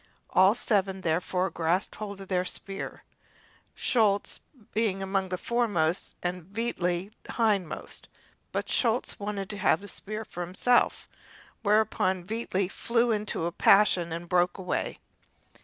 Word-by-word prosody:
All 190 +3 +6
seven, 195 -5 +1
therefore, 180 +2 0
grasped 170 +4 0
hold 200 -2 -6
of 195 - -9
their 180 -1 +1
spear, 195 +1 -6 0.7
Schulz 210 -5 +1 0.3
being 200 -3 +1
among 190 -1 -1
the 185 - -2
foremost 190 -7 0
and 180 0 -2
Veitli 190 -3 -2 0.3
hindmost. 210 -7 -1 0.4
But - - -2
Schulz 235 -1 +1
wanted 200 -1 -3
to 205 - -4
have 200 - +3
the 205 - -10
spear 215 +2 -4
himself, 185 +8 +1 0.5
whereupon 205 -4 +2
Veitli 200 -3 -1
flew 235 +4 +1
into 210 -6 -1
a 170 - -1
passion 185 -2 +4
and 170 +1 -5
broke 180 0 +2
away. 180 -2 -2
195 Hz, 125 wpm, -28 LUFS, 180-215 Hz, 0.7 s, All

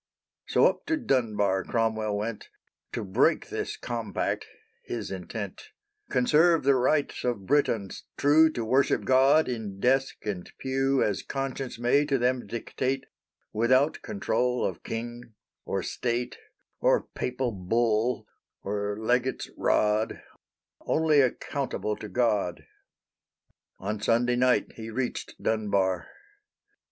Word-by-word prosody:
So - - +4
up - - +1
to 325 - +1
Dunbar 105 - +1
Cromwell 110 -2 0
went; 105 +1 -4 0.4
To 115 - -2
break 95 -2 +2
this - - -4
compact 115 -2 -3 0.4
his 115 -4 -5
intent, 95 +1 -6 0.4
Conserve 155 +6 +4
the 140 +1 +5
rights 140 +3 +1
of 120 -6 -2
Britons 115 -8 0
true 155 +3 +5
To 115 - -3
worship 130 +4 +2
God 135 +4 +5
in 110 -6 -4
desk 135 +4 +2
and 95 -4 -4
pew 135 0 +1
As 105 -3 0
conscience 135 -2 -4
may 120 +5 +3
to 140 -2 +1
them 125 0 0
dictate, 130 +3 -2 0.5
Without 130 +7 +3
control 125 -11 0
of 95 - -3
king, 120 0 -6 0.3
or - - -2
state, 120 0 -2 0.4
Or - - +3
Papal 125 0 -2
"bull," 115 +4 0 0.4
or 100 0 -2
legate's 125 +3 0
rod 105 +1 +1 0.6
Only 155 -2 +3
accountable 130 -4 -1
to 105 - -8
God. 105 -5 0 1.1
On 105 -1 -4
Sunday 120 +2 +2
night 125 0 +2
he 110 0 -6
reached 125 +2 -3
Dunbar. 100 -4 0
120 Hz, 120 wpm, -27 LUFS, 105-130 Hz, 1.1 s, the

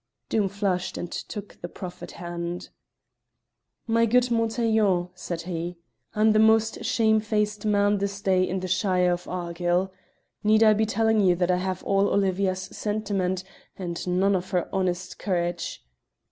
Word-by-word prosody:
Doom 205 -3 +1
flushed, 190 -2 -1
and 175 - -5
took 210 -2 -7
the 175 - -5
proffered 180 -1 -8
hand. 175 -1 -5 1.2
"My 230 0 +3
good 250 +2 +3
Montaiglon," 220 -5 +2
said 175 -2 -5
he, 175 0 -4 0.4
"I'm 215 +1 +4
the 215 - +4
most 220 0 +3
shamefaced 215 -1 +1
man 205 0 +3
this 200 0 -2
day 190 -2 +2
in 185 0 -2
the 185 - -3
shire 180 -1 +2
of 175 0 -5
Argyll. 175 +1 -1 0.5
Need 215 +1 +5
I 215 -1 +7
be 215 +1 +1
telling 220 0 +2
you 180 -3 +4
that 180 +1 +1
I 180 - +2
have 185 0 -3
all 195 0 +2
Olivia's 190 -1 +1
sentiment 195 -2 -2 0.3
and 175 -2 -5
none 190 +2 +2
of 185 0 -3
her 180 -2 -1
honest 185 -1 -2
courage?" 175 - -2
190 Hz, 150 wpm, -26 LUFS, 180-215 Hz, 1.2 s, I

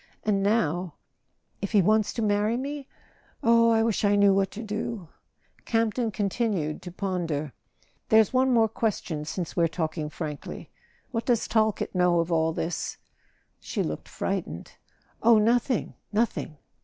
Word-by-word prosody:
And 200 -2 +1
now—if 190 0 -3
he 210 - +6
wants 215 +2 +3
to 230 - -2
marry 210 +2 +1
me? 280 +1 -5 0.6
Oh, 230 0 +5
I 225 -1 +4
wish 225 -2 0
I 205 0 +4
knew 200 -1 +5
what 195 -1 +2
to 220 +4 -7
do! 210 -4 -4 0.3
" - - -36
Campton 230 +1 +1
continued 200 -6 -1
to 180 - -8
ponder. 170 - -3 0.6
"There's 220 +1 +5
one 260 0 +3
more 230 -2 +4
question, 200 -8 -2
since 170 +2 -4
we're 170 -1 +3
talking 155 -1 -3
frankly: 150 -2 -7 0.4
what 230 -2 -3
does 240 -3 +2
Talkett 220 -2 +1
know 180 -2 +3
of 170 +1 -1
all 160 -1 +2
this?" 165 +1 -3 0.6
She - - -2
looked 75 0 -5
frightened. 80 +3 -4 0.5
"Oh, 230 0 +6
nothing, 235 +3 +1 0.2
nothing!" 210 -8 -1
205 Hz, 145 wpm, -26 LUFS, 170-225 Hz, 0.6 s, he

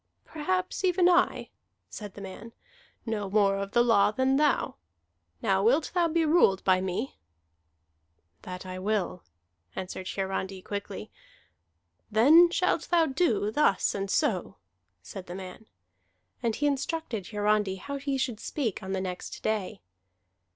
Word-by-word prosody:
"Perhaps 185 - -2
even 360 -1 +3
I," 360 0 +2 0.4
said 205 -3 -9
the 205 - -9
man, 200 +4 -9 0.5
"know 210 -4 -3
more 200 -1 +3
of 200 0 -5
the 240 - +5
law 230 -5 +4
than 260 +5 +1
thou. 295 0 +1 0.7
Now 190 0 +2
wilt 260 +9 +2
thou 350 -2 +3
be 330 0 +1
ruled 300 - +4
by 185 -1 +3
me?" 180 - -3 1.2
"That 180 0 -8
I 185 0 -6
will," 195 -2 -1 0.5
answered 185 0 -5
Hiarandi 190 -1 -3
quickly. 200 - -6 1.0
"Then 300 +11 +7
shalt 365 +1 0
thou 340 -2 +4
do 265 - +1
thus 220 -7 +2
and 195 0 -3
so," - - 0 0.5
said 185 - -9
the 175 - -7
man. 190 +3 -9 0.7
And 230 -3 0
he 295 - -1
instructed 280 - -2
Hiarandi 210 -2 +1
how 280 +9 -6
he 275 0 -2
should 245 -4 -2
speak 240 -10 -3
on 190 0 -5
the 190 - -1
next 180 -1 -6
day. 210 - -2
210 Hz, 140 wpm, -28 LUFS, 190-280 Hz, 1.2 s, Then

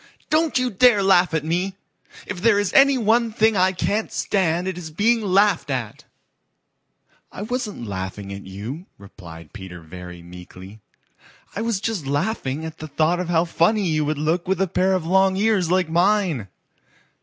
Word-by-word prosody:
"Don't 310 -2 +2
you 255 -1 0
dare 210 0 +4
laugh 185 -2 +4
at 155 -1 -1
me! 180 +4 -1 0.5
If 190 -4 -6
there 225 -1 +4
is 205 -2 -1
any 275 0 +6
one 230 0 +2
thing 220 0 +2
I 185 0 +3
can't 205 +4 -2
stand 180 -2 0
it 190 - -3
is 175 -3 -7
being 225 +8 +1
laughed 195 -5 +2
at." 120 -6 -4 1.3
"I 205 - -7
wasn't 220 - -4
laughing 100 0 -6
at 100 - -7
you," 115 - -7
replied 85 -5 -13
Peter 95 -4 -9
very 90 +1 -11
meekly. 90 +3 -12 0.8
"I 205 - -3
was 225 -3 -1
just 205 -9 -3
laughing, 145 -1 -2
at 160 - -8
the 155 - -7
thought 155 +4 +1
of 180 -1 -3
how 170 0 +2
funny 185 +4 +1
you 155 -1 +1
would 150 0 -2
look 160 +4 -1
with 190 -1 0
a 195 - +1
pair 190 +2 +1
of 180 -3 -2
long 190 +2 +3
ears 200 -4 +1
like 185 -1 +2
mine. 175 - +1
180 Hz, 175 wpm, -22 LUFS, 140-205 Hz, 1.3 s, any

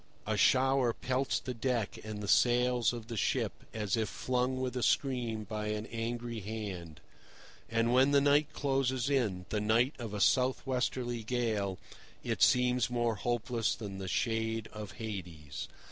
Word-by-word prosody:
A 110 - 0
shower 130 +2 +4
pelts 130 +3 0
the 125 - -5
deck 120 -2 -1
and 105 -1 -6
the - - -4
sails 125 +1 +4
of 120 -2 -7
the 115 - -5
ship 105 - +1 0.2
as 105 -2 -1
if 110 -2 -1
flung 130 +1 -1
with 130 -1 -2
a 125 - -1
scream 120 -5 +1
by 105 0 -4
an 105 0 -2
angry 115 0 -3
hand; 95 -6 -6 0.7
and 115 +1 +2
when 130 +2 +5
the 140 0 +5
night 145 +1 +3
closes 135 -1 0
in, 105 -10 0
the 105 - -1
night 115 +6 +3
of 110 -4 -5
a - - -3
south 130 +4 +3
westerly 125 -2 -1
gale, 110 -5 -1 0.5
it - - -2
seems 125 -1 +4
more 120 -1 +1
hopeless 120 +1 -1
than 100 -3 -7
the 95 - -5
shade 115 +1 -1
of 105 -3 -7
Hades. 90 -10 -6
115 Hz, 160 wpm, -32 LUFS, 105-125 Hz, 0.7 s, when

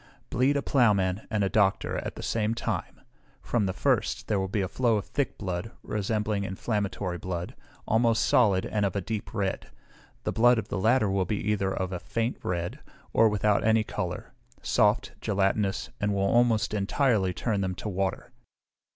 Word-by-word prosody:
Bleed 135 +3 +2
a 140 - -1
ploughman 105 -6 +2
and 110 -3 0
a - - +2
doctor 100 -1 +1
at - - -6
the - - -8
same 110 0 0
time; - - -4 0.4
from 110 -5 0
the - - 0
first 95 - 0
there 105 -2 +1
will 95 0 -1
flow 115 +2 +1
a - - -1
thick 140 -2 -2
blood, 95 +1 -3
resembling 105 0 -1
inflammatory 100 -2 -2
blood, 90 0 -4 0.3
almost 115 0 +3
solid, 100 -7 +3
and 105 -1 -1
of 100 -2 0
a 100 - 0
deep 110 +2 -4
red; 100 -4 -2 0.5
the - - -1
blood 120 +2 +5
of 110 - -3
the 100 - -2
latter 115 +2 +3
will 95 -1 +1
be 105 +2 -1
either 95 -2 0
of 95 -1 -2
a 90 - -3
faint 115 +6 -2
red, 85 -1 -3 0.3
or 115 - +5
without 105 0 +2
any 110 0 +4
colour, - - -5 0.3
soft, 105 +2 +2
gelatinous, 100 -1 0
and 100 0 0
will 100 - 0
almost 115 +1 +3
entirely 105 -1 +1
turn 105 +2 -1
them 95 -1 -2
to - - -6
water. 95 -2 -2
105 Hz, 175 wpm, -27 LUFS, 95-115 Hz, 0.5 s, blood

